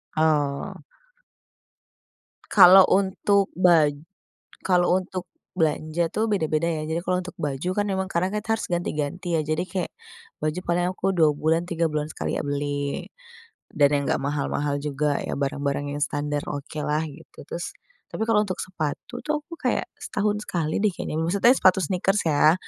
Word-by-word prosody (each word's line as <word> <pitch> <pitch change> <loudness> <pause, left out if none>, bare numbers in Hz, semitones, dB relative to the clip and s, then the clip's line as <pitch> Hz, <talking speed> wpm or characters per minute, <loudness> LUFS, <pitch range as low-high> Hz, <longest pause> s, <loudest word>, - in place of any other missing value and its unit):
Oh. 155 +3 0 1.7
Kalau 190 -1 +8
untuk 195 +1 +2
baj 165 -5 +4 0.7
kalau 180 0 +3
untuk 185 -1 -6 0.2
belanja 160 0 0
tuh 220 +5 0
beda-beda, 160 -4 +1
ya. 160 -2 -1
Jadi 160 +1 -1
kalau 180 0 +1
untuk 185 - -9
baju 150 +1 -3
kan 205 0 0
memang 190 -1 -1
karena 180 +1 +1
kita 225 +1 -1
harus - - -4
ganti-ganti 170 0 -2
ya, 155 - +1
jadi 155 +2 0
kayak 185 -2 -3 0.5
baju 155 +3 -1
paling 175 +1 +1
aku 185 +1 -4
2 160 -3 +5
bulan, 160 +3 +1
3 170 -1 0
bulan 150 0 -1
sekali - - -3
ya - - -1
beli. 145 0 -2 0.6
Dan 145 -1 +3
yang 140 - +1
nggak - - 0
mahal-mahal 145 0 -1
juga 145 0 -1
ya, - - -3
barang 140 0 -2
barang 140 0 -1
yang 145 - -4
standar 145 0 -1
okelah, 150 +1 -2
gitu. 145 - -14
Terus 170 - -5 0.3
tapi 220 - -3
kalau 225 -2 +3
untuk 185 - -3
sepatu 180 - -5
tuh 300 -1 -2
aku 345 - -24
kayak - - 0 0.2
setahun 210 0 -1
sekali 160 0 -1
deh 215 - +3
kayaknya, 155 - -4
maksudnya 200 +9 +4
sepatu 185 -7 +4
sneakers, 190 +5 +1
ya. 155 +1 +5
165 Hz, 160 wpm, -24 LUFS, 150-185 Hz, 1.7 s, Kalau